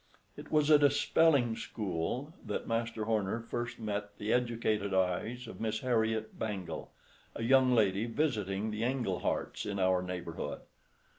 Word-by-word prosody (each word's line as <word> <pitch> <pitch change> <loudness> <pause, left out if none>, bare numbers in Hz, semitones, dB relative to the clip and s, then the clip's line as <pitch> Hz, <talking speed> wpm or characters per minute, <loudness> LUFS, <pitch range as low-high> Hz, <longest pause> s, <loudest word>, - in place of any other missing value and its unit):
It - - -10
was 150 0 +3
at 150 -1 +7
a 145 - +7
"spelling 140 -4 +3
school" 115 - -3
that - - -4
Master 115 -1 -1
Horner 110 -1 0
first 120 +1 -4
met 105 -1 -4
the 105 +2 0
educated 115 -5 0
eyes 95 +7 0
of 115 - -9
Miss 110 -1 -1
Harriet 110 -3 0
Bangle, 100 -5 -4 0.4
a 115 - -4
young 130 +1 +5
lady 100 -1 +3
visiting 110 -6 -1
the 105 +1 -4
Engleharts 120 -6 -1
in 100 -1 -3
our 95 -1 +3
neighborhood. 90 -2 -5
110 Hz, 145 wpm, -32 LUFS, 100-120 Hz, 0.4 s, at